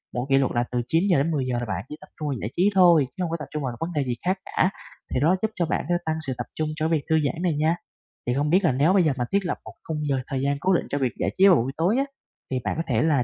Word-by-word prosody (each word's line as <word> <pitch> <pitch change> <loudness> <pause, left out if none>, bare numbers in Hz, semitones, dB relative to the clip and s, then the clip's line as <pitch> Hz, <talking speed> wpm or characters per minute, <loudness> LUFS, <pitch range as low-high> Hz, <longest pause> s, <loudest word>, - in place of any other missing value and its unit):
Mỗi 120 +1 -1
kỷ 135 - +5
luật 135 -2 +2
là 120 - +2
từ 125 -1 0
9:00-10:00 155 -6 +1
là 120 - -3
bạn 95 -1 -4
chỉ 150 - -6
tập - - -13
trung 155 - -3
vào 140 - -1
giải 105 - -3
trí 185 +4 +4
thôi, 175 -6 +6
chứ 185 - -1
hông 170 - -2
có 165 - -1
tập 150 - -5
trung 150 -1 -3
vào 125 -3 -3
vấn 165 +2 -3
đề 145 -3 +1
gì 125 -2 -2
khác 185 +2 +2
cả, 185 - +1 0.4
thì - - +1
đó, 160 +7 +4
giúp 220 - 0
cho 175 - +1
bạn 160 - -1
sẽ 175 - +3
tăng 160 0 0
sự 130 - 0
tập 120 - -3
trung 155 - -1
cho 155 +1 0
cái - - -3
việc - - -12
thư 160 - +4
giãn 165 +4 -2
này 175 -3 +2
nha. 160 +2 +3 0.5
Thì 120 - +2
không 145 +3 0
biết 185 +5 +4
là 160 - +4
nếu 145 +8 +3
bây 195 -2 +5
giờ 155 - +3
mà 125 - 0
thiết 200 -1 +1
lập 175 - -1
một - - -9
khung 160 - -2
giờ 135 - +2
thời 135 -1 -2
gian 140 +1 0
cố 190 +5 +2
định 175 - +1
cho 145 - -1
việc 130 -4 0
giải - - 0
trí 195 +1 +7
vào 185 - +7
buổi 130 -1 0
tối 175 +7 +2
á, 270 - +3 0.5
thì 130 - 0
bạn - - -1
có 165 - 0
thể 120 -4 +1
là 145 -6 +3
155 Hz, 330 wpm, -25 LUFS, 135-175 Hz, 0.5 s, trí